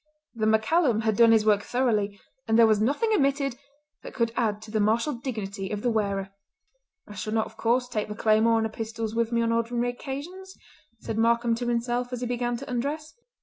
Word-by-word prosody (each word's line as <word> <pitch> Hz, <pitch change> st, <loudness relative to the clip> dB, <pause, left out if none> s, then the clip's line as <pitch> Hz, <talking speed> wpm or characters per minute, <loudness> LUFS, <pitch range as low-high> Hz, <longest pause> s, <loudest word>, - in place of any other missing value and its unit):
The 220 Hz, -2 st, -1 dB
MacCallum 220 Hz, +2 st, +2 dB
had 220 Hz, -1 st, +1 dB
done 230 Hz, +1 st, +6 dB
his 220 Hz, -1 st, +4 dB
work 210 Hz, -2 st, +4 dB
thoroughly, 210 Hz, -5 st, 0 dB, 0.3 s
and 225 Hz, 0 st, +3 dB
there 230 Hz, -, +7 dB
was 215 Hz, -1 st, +3 dB
nothing 290 Hz, -, +1 dB
omitted 275 Hz, -, +1 dB, 0.5 s
that -, -, -10 dB
could 230 Hz, -2 st, +1 dB
add 215 Hz, -4 st, 0 dB
to 220 Hz, -, -11 dB
the 215 Hz, -, 0 dB
martial 225 Hz, +8 st, +1 dB
dignity 210 Hz, -6 st, -5 dB
of 210 Hz, -1 st, -4 dB
the 245 Hz, -, +2 dB
wearer. 200 Hz, -3 st, -1 dB, 0.8 s
"I 210 Hz, -, -10 dB
shall 215 Hz, +2 st, -4 dB
not, 220 Hz, -1 st, +1 dB
of -, -, -13 dB
course, 245 Hz, +2 st, +1 dB
take 220 Hz, -4 st, -3 dB
the 210 Hz, -, -6 dB
claymore 220 Hz, +1 st, +3 dB
and 220 Hz, -, +1 dB
the -, -, -2 dB
pistols 225 Hz, 0 st, -5 dB
with 230 Hz, 0 st, 0 dB
me 235 Hz, 0 st, +1 dB
on 230 Hz, -, +1 dB
ordinary 235 Hz, +1 st, 0 dB
occasions," 320 Hz, +10 st, -8 dB, 0.4 s
said 225 Hz, -, -4 dB
Markam 235 Hz, +1 st, +2 dB
to 240 Hz, +1 st, -3 dB
himself 240 Hz, +1 st, -1 dB
as 250 Hz, -1 st, -4 dB
he -, -, -1 dB
began 240 Hz, 0 st, -1 dB
to -, -, -9 dB
undress. 285 Hz, +5 st, -3 dB
230 Hz, 210 wpm, -26 LUFS, 220-245 Hz, 0.8 s, there